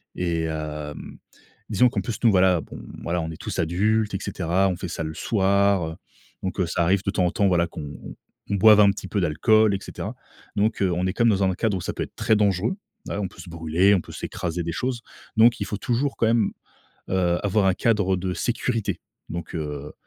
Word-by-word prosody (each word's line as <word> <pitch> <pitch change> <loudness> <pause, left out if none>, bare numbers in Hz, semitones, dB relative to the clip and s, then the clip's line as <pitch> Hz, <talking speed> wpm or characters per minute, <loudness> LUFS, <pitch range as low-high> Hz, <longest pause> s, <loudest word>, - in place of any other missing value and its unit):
et 85 -2 -1
heu, 75 -1 -4 0.8
disons 115 +4 +4
qu'en - - -2
plus 115 - -4
nous, 115 - +6
voilà, 90 -3 +4
bon, - - -10 0.2
voilà, 85 +1 -1
on 80 - -4
est - - -7
tous - - -5
adultes 105 +6 +1
et 95 - -1
cetera. 95 +2 0
On 90 - -2
fait 90 - -5
ça 80 0 -4
le 80 0 -4
soir, 100 -5 +1 0.5
donc 95 - -3
ça 85 +1 +1
arrive 95 +3 +2
de 100 - 0
temps 90 -3 +1
en 90 - +1
temps, 100 - +2
voilà, 85 -1 +2
qu'on 75 -3 -8 0.5
qu'on 100 - +1
boive 105 +1 +7
un 100 -1 +7
petit 95 -1 -8
peu 100 - 0
d'alcool 100 +6 +3
et - - -3
cetera, - - -6 0.4
donc 105 +1 +1
heu, 95 - +3
on 90 +2 -1
est 95 - +1
quand 115 - +1
même 115 - +6
dans 95 - 0
un 95 -1 +2
cadre 105 +1 0
où - - -5
ça - - -3
peut - - -3
être - - -11
très 110 0 +2
dangereux, 100 - +1 0.3
voilà, - - -4
on 95 - -1
peut - - -13
se 90 - -11
brûler, 85 +4 +2
on - - +2
peut - - -12
s'écraser 85 0 -4
des 85 - -3
choses 125 +4 -2 0.4
donc 115 +2 +6
il - - -2
faut - - -4
toujours 130 +4 -1
quand 115 - +2
même, 115 -2 +2 0.6
heu, 90 -2 +1
avoir 100 0 +2
un 95 - +4
cadre 100 -3 +1
de 90 0 -3
sécurité. 120 -2 -1 0.3
Donc 85 +1 -6
heu, 75 -2 -5
95 Hz, 225 wpm, -24 LUFS, 85-105 Hz, 0.8 s, boive